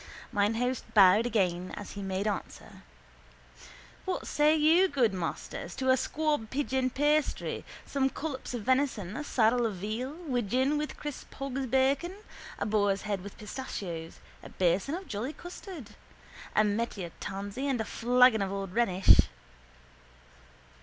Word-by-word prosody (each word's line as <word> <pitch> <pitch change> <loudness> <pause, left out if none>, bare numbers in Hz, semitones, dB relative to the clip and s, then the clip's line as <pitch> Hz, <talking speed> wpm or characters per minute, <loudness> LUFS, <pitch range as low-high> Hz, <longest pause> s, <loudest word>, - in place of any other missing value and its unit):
Mine 205 +2 +2
host 250 +2 -1
bowed 205 +3 +7
again 185 -5 0
as 205 - -7
he 200 - -7
made 190 +1 -2
answer: 205 -3 -5 1.2
—What 375 - -2
say 300 +1 +3
you, 320 +5 +5
good 255 - +2
masters, 175 -1 -4
to 260 -1 +2
a - - +6
squab 295 -3 -1
pigeon 265 -2 0
pasty, 295 +3 0 0.2
some 270 -1 +1
collops 270 -4 -5
of 230 - -4
venison, 250 -7 +1
a 300 - -3
saddle 240 -3 +2
of 220 -4 -1
veal, 215 +8 -3
widgeon 260 +2 +1
with 300 - -4
crisp 295 -2 -7
hog's 275 -1 -3
bacon, 270 +7 +2 0.4
a - - -2
boar's 205 -2 +1
head 205 -3 -2
with 200 +1 -10
pistachios, 195 -8 -6 0.2
a - - -11
bason 185 - +1
of 375 0 -7
jolly 245 +4 -3
custard, 350 - -9 0.6
a 215 - +5
medlar 205 -4 -2
tansy 200 +7 -4
and 265 -4 0
a 220 - -1
flagon 245 0 +4
of 195 -1 -1
old 195 -2 -4
Rhenish? 195 -5 +5
240 Hz, 145 wpm, -30 LUFS, 200-275 Hz, 1.2 s, bowed